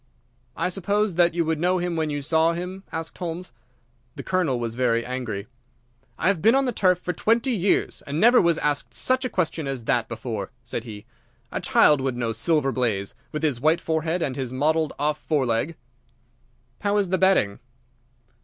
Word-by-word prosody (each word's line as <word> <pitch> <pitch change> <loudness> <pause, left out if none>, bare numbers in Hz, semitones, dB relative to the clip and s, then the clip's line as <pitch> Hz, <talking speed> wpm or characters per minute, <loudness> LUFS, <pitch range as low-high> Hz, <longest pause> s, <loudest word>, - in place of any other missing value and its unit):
"I - - 0
suppose 200 +2 0
that 170 0 +3
you 170 -1 +1
would 160 -1 -1
know 180 +2 +2
him 175 -1 -2
when 160 -1 -1
you 145 -1 -3
saw 160 +3 +3
him?" 180 +3 -5
asked 160 0 -5
Holmes. 175 0 -5 0.6
The - - -7
Colonel 175 -9 0
was 115 -1 -3
very 115 -1 +1
angry. 120 -6 -4 0.7
"I - - 0
have 190 -4 +2
been 225 +5 +5
on 270 0 +3
the 250 - 0
turf 185 -5 +3
for 180 0 -4
twenty 230 - +1
years, 200 -4 +1
and 145 +2 -2
never 240 +5 +6
was 170 -2 +3
asked 140 -5 -1
such 255 - +1
a - - -1
question 165 -6 -1
as 135 -3 -4
that 120 +1 +1
before," 115 -4 -5
said 115 0 -5
he. 105 -3 -9 0.5
"A - - -3
child 150 -3 +4
would 130 -2 -2
know 115 -2 -1
Silver 135 +5 +1
Blaze, 110 -7 -1 0.2
with 150 +1 -4
his 140 -6 0
white 160 +4 +3
forehead 160 +1 -1
and 130 - -2
his 130 -3 -4
mottled 155 +4 +1
off 150 +1 0
foreleg." 140 0 0 1.0
"How 205 0 +1
is 200 -3 +1
the 185 0 +1
betting?" 190 - +3
160 Hz, 190 wpm, -24 LUFS, 125-180 Hz, 1.0 s, never